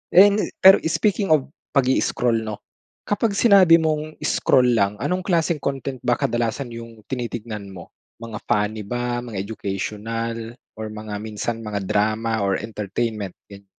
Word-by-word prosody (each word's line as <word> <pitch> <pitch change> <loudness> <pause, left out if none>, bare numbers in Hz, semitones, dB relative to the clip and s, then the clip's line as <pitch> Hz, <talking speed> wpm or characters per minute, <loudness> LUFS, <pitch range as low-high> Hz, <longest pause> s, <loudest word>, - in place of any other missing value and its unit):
And, 200 +3 +7 0.2
pero 190 +1 +9
speaking 200 +3 +1
of 135 -2 -3 0.2
pag-i-scroll 125 -3 +2
'no, 110 -2 -5 0.4
kapag 205 0 0
sinabi 195 -7 +7
mong 155 -1 0
scroll 125 -1 +3
lang, 100 -1 +2
anong 180 +6 0
klaseng 170 -3 +1
content 135 -2 -3
ba 120 - +2
kadalasan 120 +2 -1
yung 115 -1 -10
tinitignan 115 -4 -4
mo? 90 -2 -11 0.3
Mga 110 -2 -6
funny 105 +1 0
ba? 120 +1 -2
Mga 115 -6 -5
educational 115 +3 -4 0.2
or 110 - -4
mga 105 0 -7
minsan, 110 +2 -4
mga 105 -2 -4
drama 110 +2 0
or 100 -1 +1
entertainment, 105 -1 -4 0.2
ganyan. 100 0 -12
115 Hz, 140 wpm, -22 LUFS, 105-140 Hz, 0.4 s, pero